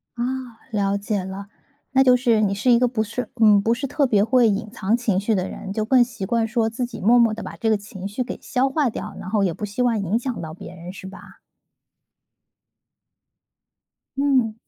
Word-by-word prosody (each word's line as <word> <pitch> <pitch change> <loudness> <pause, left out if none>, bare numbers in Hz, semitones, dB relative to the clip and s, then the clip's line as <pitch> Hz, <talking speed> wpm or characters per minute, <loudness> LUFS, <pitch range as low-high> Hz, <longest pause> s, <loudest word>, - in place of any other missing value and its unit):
啊， 240 - -2 0.5
了 200 -2 0
解 200 -1 -2
了。 190 +2 -7 0.5
那 265 0 +5
就 255 -1 +6
是 240 -3 +2
你 200 -2 +1
是 215 +6 +1
一 235 - +5
个 250 - +3
不 230 -3 -1
是 230 +2 -5
嗯， 210 -2 +6
不 225 +3 +2
是 260 +4 -3
特 280 +1 +1
别 205 -4 +3
会 245 +1 +4
隐 210 +1 -1
藏 215 -1 0
情 225 -6 0
绪 210 +2 0
的 185 -1 -1
人。 195 - -7
就 215 - -1
更 250 +2 +5
习 230 -5 -6
惯 230 +2 0
说 225 -1 0
自 245 +3 -3
己 240 -2 -9
默 230 +5 +5
默 230 -2 +4
地 220 - -6
把 - - -7
这 225 - 0
个 215 - +3
情 200 -2 -8
绪 205 +6 -3
给 250 - -7
消 265 +1 0
化 280 -1 +1
掉， 210 -1 -6
然 185 - -7
后 210 0 +1
也 180 -3 +1
不 210 - -5
希 205 +4 -4
望 235 -3 +2
影 195 +3 0
响 250 -1 -4
到 155 -1 -7
别 175 - -10
人 175 +1 -9
是 190 - -9
吧？ 190 - -13 2.8
嗯。 265 -5 +2
220 Hz, 235 characters per minute, -22 LUFS, 200-245 Hz, 2.8 s, 就